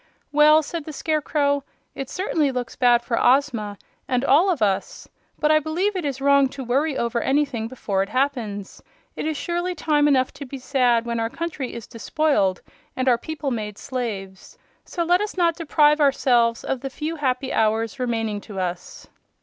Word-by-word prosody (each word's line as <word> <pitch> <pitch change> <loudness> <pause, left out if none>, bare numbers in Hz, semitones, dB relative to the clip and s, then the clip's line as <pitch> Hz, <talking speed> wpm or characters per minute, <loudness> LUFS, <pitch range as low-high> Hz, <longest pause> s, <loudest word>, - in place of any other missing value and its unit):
"Well," 305 +1 +6
said 320 +1 -5
the 310 - -7
Scarecrow, 285 -2 0 0.3
"it 270 - -6
certainly 320 -7 0
looks 250 -2 -4
bad 240 -2 +4
for 235 -1 -1
Ozma, 235 -6 +2 0.3
and 250 +1 0
all 320 +9 +5
of 345 -7 0
us. 195 -2 -1 0.3
But 300 - +2
I 310 - +5
believe 345 +7 -1
it 360 -4 -2
is 275 -2 -3
wrong 280 -1 +4
to 265 - -4
worry 270 +4 0
over 235 0 -1
anything 270 -5 0
before 210 -6 -2
it 195 - -2
happens. 240 -7 -2 0.3
It - - -3
is 310 -2 -2
surely 350 +3 -2
time 295 -2 +2
enough 260 -3 +2
to 280 - -8
be 275 - -7
sad 250 -3 +1
when 235 -1 -2
our 225 0 -1
country 310 -5 -5
is 235 - -7
despoiled 230 - 0 0.3
and 255 0 -2
our 240 -2 +4
people 300 -2 -4
made 210 -3 -4
slaves. 205 -8 -6 0.3
So 345 - -2
let 355 +3 +3
us 420 -2 -4
not 340 -2 +2
deprive 300 -2 +3
ourselves 240 -5 +3
of 265 -2 -3
the 270 - -4
few 310 +4 -4
happy 265 -2 -1
hours 225 +3 0
remaining 225 -4 -2
to 200 -3 -8
us." 180 -1 -5
270 Hz, 180 wpm, -23 LUFS, 235-300 Hz, 0.3 s, Well